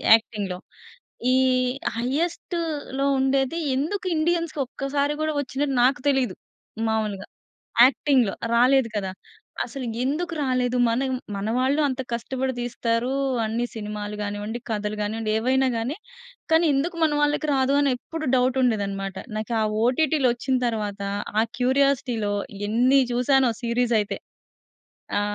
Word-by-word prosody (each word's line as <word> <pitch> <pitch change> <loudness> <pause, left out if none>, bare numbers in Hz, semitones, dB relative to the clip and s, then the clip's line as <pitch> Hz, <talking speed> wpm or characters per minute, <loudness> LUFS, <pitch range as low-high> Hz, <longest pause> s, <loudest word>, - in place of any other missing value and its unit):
యాక్టింగ్‌లో. 205 -5 -3 0.7
ఈ - - +4 0.6
హైఎస్ట్‌లో 300 +1 -2
ఉండేది 270 +3 +1 0.2
ఎందుకు 355 +9 -2
ఇండియన్స్‌కీ 335 -1 0
ఒక్కసారి 280 +3 -1
గూడా 310 0 0
ఒచ్చినట్టు 275 +1 -2
నాకు 255 0 +2
తెలిదు. 265 -3 +1 0.5
మాములుగా 215 -3 -2 0.6
యాక్టింగ్‌లో, 255 -4 +2 0.2
రాలేదు 255 +1 +4
కదా! 190 -2 -3 0.5
అసలు 255 +2 -6 0.2
ఎందుకు 335 +6 -1
రాలేదు, 250 -1 +1
మనం 260 +4 0 0.3
మన 200 +2 -3
వాళ్ళు 270 +4 +2
అంత 265 -2 -2
కష్టపడి 260 +3 -2
తీస్తారు. 240 +1 -1 0.3
అన్ని 225 +2 -1
సినిమాలు 210 -1 -5
గానివ్వండి, 205 +3 -4
కథలు 210 -1 -2
గానివ్వండి. 215 +1 -2
ఏవైనా 260 +3 +2
గాని. 235 +7 -2 0.5
కానీ 325 +1 +5
ఎందుకు 330 +6 -1
మన 310 - +2
వాళ్ళకి 295 +1 +1
రాదు, 265 +1 +2
అని 285 -1 +3
ఎప్పుడు 320 +5 -6
డౌట్ 255 0 +2
ఉండేది 220 -5 +2
అన్నమాట. 195 -1 -5 0.2
నాకా 220 +2 -2 0.3
ఓటిటిలొచ్చిన 260 -1 +2
తరువాత, 210 -3 -3 0.4
ఆ - - +4 0.2
క్యూరియాసిటీ‌లో 255 -4 +1 0.4
ఎన్ని 250 +5 +4
చూసానో 255 +1 +3
సీరీస్ 240 0 +1
అయితే. 205 - -3 1.0
ఆ! - - +2
255 Hz, 120 wpm, -24 LUFS, 225-275 Hz, 1.0 s, కానీ